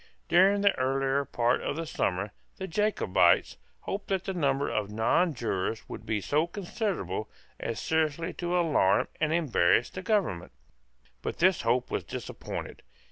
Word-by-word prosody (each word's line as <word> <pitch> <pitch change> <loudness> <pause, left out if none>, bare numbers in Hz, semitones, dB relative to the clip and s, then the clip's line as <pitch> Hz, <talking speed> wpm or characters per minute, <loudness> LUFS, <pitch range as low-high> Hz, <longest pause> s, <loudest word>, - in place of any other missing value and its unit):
During 190 +4 +5
the 200 0 +4
earlier 135 +1 +1
part 120 0 +1
of - - -2
the 165 +1 -3
summer, 100 - -1 0.3
the 190 - -4
Jacobites 95 - +2 0.2
hoped 200 +1 -4
that 190 -2 0
the 195 - -3
number 140 -5 +1
of 105 -2 -1
nonjurors 115 - 0
would - - -9
be 110 -2 0
so 150 - +1
considerable 175 - -3 0.3
as 115 - -3
seriously 160 +1 0
to 175 0 -1
alarm 145 - +3
and 155 0 +1
embarrass 120 - +2
the 185 - -6
Government. 185 - -1 0.7
But - - -4
this 185 +2 +3
hope 120 +2 +1
was - - -1
disappointed. - - -6
145 Hz, 145 wpm, -28 LUFS, 110-180 Hz, 0.7 s, During